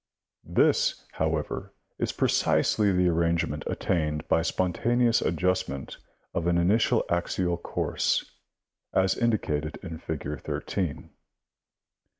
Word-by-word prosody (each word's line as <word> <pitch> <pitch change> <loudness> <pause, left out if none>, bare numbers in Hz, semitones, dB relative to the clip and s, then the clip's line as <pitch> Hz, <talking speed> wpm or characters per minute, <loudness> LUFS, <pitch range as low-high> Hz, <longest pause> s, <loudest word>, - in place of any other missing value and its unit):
This, - - +2
however, 80 -1 -2 0.2
is - - 0
precisely 105 -2 +2
the 90 -1 +3
arrangement 85 0 +1
attained 75 -4 -1
hj 80 +1 +3
spontaneous 120 +6 +2
adjustment 80 -5 -1 0.4
from 85 - -1
an 85 0 +3
initial 100 +7 +3
axial 85 0 0
course, 85 - -1 0.7
as 95 0 +3
indi 115 -2 +2
cated 75 -3 -3
in 80 -4 -6
figure 75 -3 -4
13. 90 -7 -3
85 Hz, 105 wpm, -27 LUFS, 80-95 Hz, 0.7 s, the